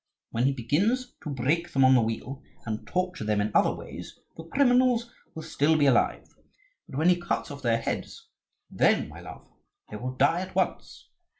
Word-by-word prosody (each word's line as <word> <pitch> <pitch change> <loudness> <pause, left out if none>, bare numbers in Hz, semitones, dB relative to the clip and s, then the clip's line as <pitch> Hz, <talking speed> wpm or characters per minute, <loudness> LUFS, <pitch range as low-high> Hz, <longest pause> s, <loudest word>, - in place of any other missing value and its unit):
When 115 +2 0
he 135 - +3
begins 200 - 0
to - - -6
break 150 +6 -1
them 135 -1 +4
on 130 - +6
the 125 - +5
wheel, 115 +5 -4 0.2
and 110 -1 -5
torture 180 -7 -2
them 105 -1 0
in 105 +1 0
other - - +4
ways, - - -9 0.2
the 165 - -9
criminals 245 +1 +2 0.2
will 160 - -6
still 155 +3 +2
be 145 - +3
alive; 130 -4 +2 0.6
but 130 - -7
when 160 +4 +3
he 175 -1 +3
cuts 170 - -2
off 140 0 -8
their 115 -2 +2
heads, - - -5 0.4
then, - - +2
my - - -11
love, - - -11 0.4
they 105 - -5
will 130 +3 -5
die 145 +7 +2
at 190 0 -8
once. - - -2
145 Hz, 190 wpm, -27 LUFS, 125-180 Hz, 0.6 s, on